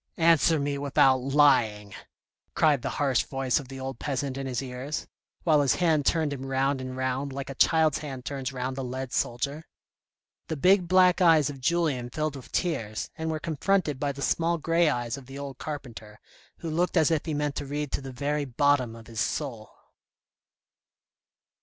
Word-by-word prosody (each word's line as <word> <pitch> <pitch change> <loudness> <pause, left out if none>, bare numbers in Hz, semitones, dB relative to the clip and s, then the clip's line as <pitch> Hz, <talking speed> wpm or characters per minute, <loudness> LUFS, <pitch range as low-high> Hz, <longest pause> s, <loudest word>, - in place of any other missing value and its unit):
" - - -42
Answer 165 0 +3
me 140 0 -2
without 135 -2 +4
lying," 125 -7 +2 0.6
cried 150 -5 +3
the - - -2
harsh 135 -5 +2
voice 135 -1 -1
of 140 - -9
the 135 0 -8
old 130 -2 -6
peasant 140 -2 -2
in 135 0 -4
his 125 -2 -2
ears, 135 +3 -5 0.4
while 155 -3 +4
his 140 -3 +2
hand 160 -5 +2
turned 160 -4 +1
him 135 -1 -6
round 135 0 0
and 130 0 -6
round, 130 +2 -2
like 140 0 -5
a - - -5
child's 160 +2 +3
hand 135 -4 -7
turns 135 -2 -3
round 130 0 -3
a - - -1
lead 130 0 -5
soldier. 140 +6 -1 0.8
The 160 - -3
big 180 +4 +4
black 185 +1 +4
eyes 160 -4 +5
of 135 -2 -11
Julien 150 -5 0
filled 155 +2 -2
with 135 - -11
tears, 115 - -2
and 160 0 -3
were 155 -1 -2
confronted 160 -1 0
by 145 0 0
the 140 0 -6
small 170 +5 +1
grey 165 +1 +2
eyes 120 -2 -2
of 135 -2 -12
the 135 +1 -9
old 140 -2 -7
carpenter, 115 -8 -7 0.4
who 165 - -4
looked 175 +3 0
as 160 0 +4
if 160 0 0
he 155 - -1
meant 145 -1 -1
to 145 - -4
read 145 0 -3
to - - -2
the 135 -1 -7
very 145 +3 -2
bottom 130 -2 +1
of 115 -1 -12
his 115 -1 -7
soul. 115 -1 -3
140 Hz, 190 wpm, -27 LUFS, 130-155 Hz, 0.8 s, eyes